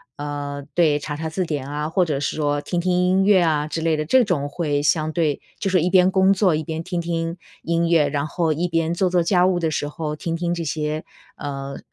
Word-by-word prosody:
呃， 145 -1 -5
对， 155 -4 +3
查 145 0 -5
查 160 +1 -4
字 180 +3 -2
典 145 -4 -3
啊， 150 +1 -3
或 180 +3 +2
者 150 -5 -1
是 140 - -2
说 145 -1 0
听 175 +2 -2
听 180 +1 0
音 180 +2 +3
乐 195 -3 +5
啊 150 -2 +1
之 165 - -3
类 165 -1 +2
的， 155 - -1
这 255 +8 +4
种 145 -8 -1
会 145 -2 -1
相 155 +1 +1
对 155 -4 0 0.2
就 195 - -1
是 185 -3 +3
一 180 - +1
边 185 0 +5
工 190 0 +4
作 185 -4 +2
一 155 - -2
边 160 +1 -4
听 180 0 -3
听 165 0 -2 0.2
音 170 0 0
乐， 165 -3 +4
然 145 0 -1
后 160 +1 0
一 170 +4 -1
边 165 0 0
做 185 +2 +2
做 180 -1 +2
家 180 +1 +3
务 185 -1 +2
的 165 -2 0
时 145 -1 -2
候 150 0 -4
听 165 +2 -3
听 170 0 -2
这 170 - -3
些， 155 0 -2 0.3
呃， 140 -1 -6
165 Hz, 260 characters per minute, -22 LUFS, 150-180 Hz, 0.3 s, 乐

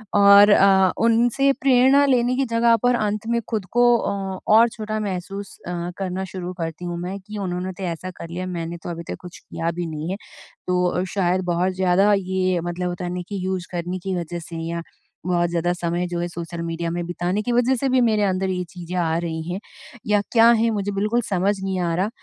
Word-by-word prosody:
और 200 0 +8
अ, 190 -2 +5
उनसे 235 +4 +3
प्रेरणा 265 +1 +5
लेने 250 -2 +2
की 270 +1 +1
जगह 230 0 +4
पर 245 0 +4
अंत 215 -1 -2
में 235 - +1
खुद 215 -5 -2
को 240 +1 +3 0.3
ओ 195 -1 -4 0.2
और 230 +2 +6
छोटा 215 -1 -4
महसूस 195 0 -5
अ, - - -3 0.3
करना 190 -1 -3
शुरू 180 -1 -5
करती 165 +2 -4
हूँ 175 -1 -3
मैं 185 +3 -4
कि 210 +2 -9
उन्होंने 185 -1 -3
तो 190 - -8
ऐसा 180 +1 -4
कर 170 -2 -10
लिया, 180 +2 -4
मैंने 170 -2 -4
तो - - -5
अभी 170 0 -5
तक - - -7
कुछ 180 -1 -11
किया 165 +1 -3
भी 175 +1 -4
नहीं 155 0 -5
है। - - -1 0.5
तो 180 0 +1
शायद 185 -2 +1
बहुत 180 +2 0
ज़्यादा 190 +2 +3 0.2
ये 185 -1 +1
मतलब 175 +1 -3
होता 175 0 -4
नहीं 180 0 -4
कि 205 - -4
यूज़ 185 -1 -2
करने 175 +1 -3
की 190 +1 -4
वज़ह 175 0 -4
से 165 0 -8
या 170 0 -3 0.4
बहुत 175 -1 +1
ज़्यादा 170 +1 0
समय 175 0 -2
जो 175 -1 -3
है 175 - -1
सोशल 170 0 -6
मीडिया 165 0 -3
में 175 0 -3
बिताने 175 +3 -2
की 245 - -2
वज़ह 245 +2 +3
से 270 +2 -1
भी 255 0 +3
मेरे 220 -3 +2
अंदर 190 -1 0
ये 180 -1 -1
चीज़ें 180 0 -7
आ 165 -2 +1
रही 165 -1 -3
हैं 185 - -3 0.5
या 205 -1 +3
क्या 230 -1 +6
है 230 - +3
मुझे 205 -1 -2
बिल्कुल 210 +4 0
समझ 195 +1 +1
नहीं 190 -1 -1
आ 170 -2 0
रहा। 190 +4 0
185 Hz, 220 wpm, -22 LUFS, 175-210 Hz, 0.5 s, और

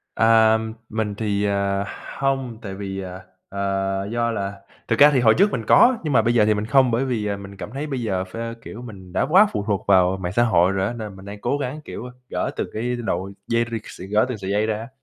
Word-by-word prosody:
À, 110 -1 +5 0.3
mình 110 -2 -2
thì, 105 -1 -1
à, 100 0 0 0.3
hông, 135 -4 -1
tại 100 -3 -6
vì, 95 -1 -5
à, 90 0 -7 0.3
ờ, 95 0 -1
do 120 0 +1
là 100 -2 -4 0.3
thực - - 0
ra 145 +1 +9
thì 135 - +3
hồi 110 -3 +5
trước 200 +4 +4
mình 115 -3 -3
có 250 0 +6
nhưng 150 -3 -1
mà 115 - +5
bây 120 +2 +1
giờ 115 -3 +4
thì 110 - +3
mình 105 0 -2
không 130 +2 +4
bởi 120 +4 +1
vì, 120 -5 -1
à, 100 -1 -2
mình 100 0 -10
cảm 105 - -7
thấy 145 +3 -4
bây 135 -4 -3
giờ 95 -5 -1
phê, 115 +5 -6
kiểu, 115 - -8
mình 95 -7 -11
đã - - +1
quá 190 +6 +7
phụ 100 - -2
thuộc 100 -1 -1
vào 95 -1 +4
mạng 90 -1 -2
xã 120 - +4
hội 95 -6 +3
rồi 95 0 0
á, 120 - -3
nên 110 -4 -7
mình 95 0 -12
đang 100 +1 -9
cố 145 - 0
gắng, 145 +2 -4
kiểu, - - -7
a, 125 - -8 0.2
gỡ - - -2
từ - - -3
cái 120 +3 -2
đội 100 -5 -3
dây 115 0 +1
rịt 115 -2 -3
s - - -11
gỡ 105 +2 +3
từng 125 - -3
sợi 95 -1 -4
dây 105 +2 +2
ra. 110 +1 -3
110 Hz, 260 wpm, -22 LUFS, 100-120 Hz, 0.3 s, ra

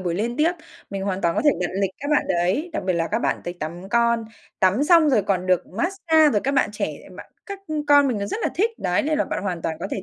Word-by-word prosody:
buổi 175 -2 -2
liên 235 +5 -2
tiếp. 315 +4 +2 0.4
Mình 195 -1 -4
hoàn 195 -1 -2
toàn 170 0 +1
có - - +1
thể 295 - +6
đặt 180 - -1
lịch 195 -1 +1
các 285 +2 -4
bạn 300 - +3
đấy, 185 - 0
đặc 315 - -3
biệt 185 - +2
là 165 -1 -1
các - - 0
bạn - - -1
tới 175 - -5
tắm 175 +5 -6
con, 235 +1 +2 0.4
tắm 195 +10 +3
xong 330 -2 +5
rồi 230 -6 +3
còn 185 -2 -1
được 185 -1 +1
mát-xa 320 - +2
rồi 205 - +2
các 275 - +1
bạn 265 - +2
trẻ 210 - -2
lại - - -16
bạn - - -11 0.2
các, 400 -1 -6
ưm, 300 -1 -3
con 285 -1 +5
mình 230 -5 -1
nó 200 - -3
rất 435 - -4
là - - +1
thích, 440 +5 +1
đấy, 180 - 0
nên 305 +1 0
là - - +2
bạn - - -4
hoàn 180 -4 -3
toàn 160 -1 -2
có 180 - -3
thể 195 - -4
215 Hz, 295 wpm, -23 LUFS, 185-300 Hz, 0.4 s, thể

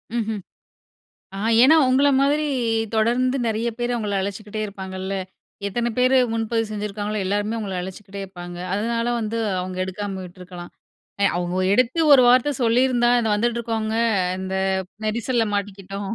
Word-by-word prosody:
ம்ஹ்ம். 220 -3 -2 1.0
ஆ - - -5 0.2
ஏன்னா, 310 +5 +7
உங்கள 270 +3 +4
மாதிரி 290 +2 +2 0.5
தொடர்ந்து 245 +4 +2
நெறைய 225 +1 0
பேர் 240 0 -1
அவங்கள 210 -4 -1
அழைச்சுகிட்டே 205 +2 -5
இருப்பாங்கல்ல. 190 -1 -6 0.5
எத்தனை 235 +4 -1
பேரு 255 +1 +4 0.2
முன்பதிவு 225 0 -1
செஞ்சுருக்காங்களோ 210 0 -3
எல்லாருமே 205 +3 -1
உங்கள 195 -3 -4
அழைச்சுக்கிட்டே 190 +2 -8
இருப்பாங்க. 175 -2 -9 0.2
அதனால 230 +3 -1
வந்து 220 +1 -3 0.2
அவங்க 185 0 -5
எடுக்காம 190 0 -5
விட்டிருக்கலாம் 180 -1 -10 0.5
எ - - +6
அவ்வோ 175 +1 -2
எடுத்து 255 +8 +2
ஒரு 270 -3 +9
வார்த்த 255 +4 +5
சொல்லியிருந்தா 240 +1 +3
இந்த 225 -2 0
வந்துட்டு 235 +2 0
இருக்கவங்க 220 -1 -2 0.4
இந்த 190 0 -4 0.5
நெரிசல 230 +2 0
மாட்டிக்கிட்டோம். 200 0 -4
215 Hz, 135 wpm, -22 LUFS, 195-235 Hz, 1.0 s, ஒரு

